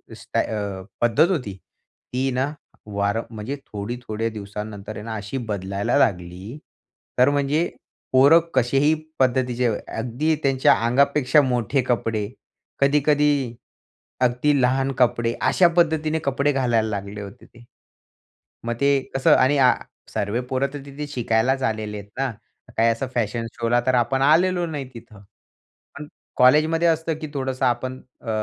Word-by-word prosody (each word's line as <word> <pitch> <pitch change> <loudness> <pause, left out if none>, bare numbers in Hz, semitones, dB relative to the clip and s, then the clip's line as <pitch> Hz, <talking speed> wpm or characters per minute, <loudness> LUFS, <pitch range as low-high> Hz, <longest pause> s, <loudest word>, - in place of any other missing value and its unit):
स्टा - - -3
अ, 100 -3 -3 0.2
पद्धत 120 +9 +4
होती 125 - -2 0.6
ती 130 +2 0
ना, 130 +3 -1 0.4
वार 100 +2 0
म्हणजे 115 +4 -5
थोडी 105 +3 -5
थोड्या 110 +1 -2
दिवसानंतर 105 0 -7
आहे 105 - -7
ना, 115 -1 -4
अशी 105 +5 -5
बदलायला 100 +3 -1
लागली 95 0 -1 0.6
तर 125 +2 +6
म्हणजे 145 +3 +1 0.4
पोरं 140 +6 +7
कसेही 135 +4 +3 0.3
पद्धतीचे 125 -1 +1 0.3
अगदी 125 +8 0
त्यांच्या 135 -1 +4
अंगापेक्षा 140 +4 +3
मोठे 125 0 0
कपडे, 115 -4 -1 0.5
कधी-कधी 145 -2 +2 0.7
अगदी 130 +3 +2
लहान 135 +2 +2
कपडे, 120 -1 +2
अशा 180 - +4
पद्धतीने 160 -2 +2
कपडे 140 +1 +1
घालायला 120 -5 +1
लागले 100 0 -5
होते 100 -1 -11
ते. 120 - -18 1.0
मग 120 - -1
ते 140 0 +4 0.2
कसं 135 - +5
आणि 140 +3 +3 0.6
सर्वे 105 +4 -1
पोरं 135 +1 0
तर 145 - -5
तिथे 140 +1 -7
शिकायलाच 130 0 0
आलेले 110 -1 -4
आहेत 100 0 -10
ना, 135 -2 0 0.5
काही 115 +1 +4
असं 115 +3 -1
फॅशन 115 0 -1
शो 115 -1 -2
ला 120 +1 +4
तर 130 - +3
आपण 135 +2 +1
आलेलो 175 +5 +3
नाही 150 -4 -5
तिथं. 110 -3 -13 0.8
पण 150 - -8 0.3
कॉलेजमध्ये 155 +6 +4
असतं, 160 0 +1
की 155 - -4
थोडंसं 130 -2 -2
आपण 130 +1 -1 0.2
अ, 115 - -7
125 Hz, 140 wpm, -23 LUFS, 110-140 Hz, 1.0 s, पोरं